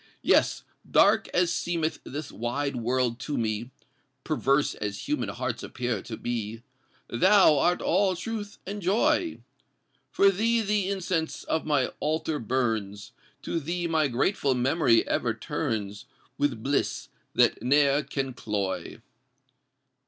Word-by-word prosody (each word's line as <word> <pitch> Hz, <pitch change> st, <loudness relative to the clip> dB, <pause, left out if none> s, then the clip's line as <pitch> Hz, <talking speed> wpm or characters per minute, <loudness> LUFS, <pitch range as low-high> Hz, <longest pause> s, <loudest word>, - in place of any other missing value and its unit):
Yes—dark 220 Hz, +2 st, +2 dB
as 175 Hz, -1 st, +1 dB
seemeth 165 Hz, -3 st, -1 dB
this 145 Hz, +2 st, -6 dB
wide 120 Hz, +6 st, -2 dB
world 125 Hz, 0 st, 0 dB
to 145 Hz, +3 st, -3 dB
me, 110 Hz, +1 st, -2 dB, 0.5 s
Perverse 145 Hz, -2 st, +1 dB
as 105 Hz, -1 st, -5 dB
human -, -, -1 dB
hearts -, -, -3 dB
appear 120 Hz, -5 st, -3 dB
to 110 Hz, -, -7 dB
be, 115 Hz, -1 st, -4 dB, 0.4 s
Thou 185 Hz, -, +5 dB
art 175 Hz, +4 st, +2 dB
all 190 Hz, +1 st, +2 dB
truth 210 Hz, +2 st, -5 dB
and 205 Hz, +2 st, -5 dB
joy! 295 Hz, -, +1 dB, 0.7 s
For 200 Hz, 0 st, +4 dB
thee 230 Hz, +4 st, +1 dB
the 205 Hz, -2 st, 0 dB
incense 180 Hz, -4 st, -2 dB
of 160 Hz, -1 st, -2 dB
my 145 Hz, -4 st, +3 dB
altar 155 Hz, 0 st, -1 dB
burns; 110 Hz, -4 st, -2 dB, 0.3 s
To 165 Hz, -, -2 dB
thee 170 Hz, +3 st, -3 dB
my 160 Hz, -3 st, +2 dB
grateful 135 Hz, +2 st, +1 dB
memory 125 Hz, -1 st, +3 dB
ever 115 Hz, -2 st, 0 dB
turns 110 Hz, -7 st, -3 dB, 0.3 s
With 130 Hz, -7 st, -1 dB
bliss 140 Hz, +1 st, -1 dB, 0.3 s
that -, -, +3 dB
ne'er 140 Hz, +3 st, +3 dB
can 135 Hz, -3 st, -4 dB
cloy! 100 Hz, -5 st, -3 dB
145 Hz, 125 wpm, -27 LUFS, 120-180 Hz, 0.7 s, Thou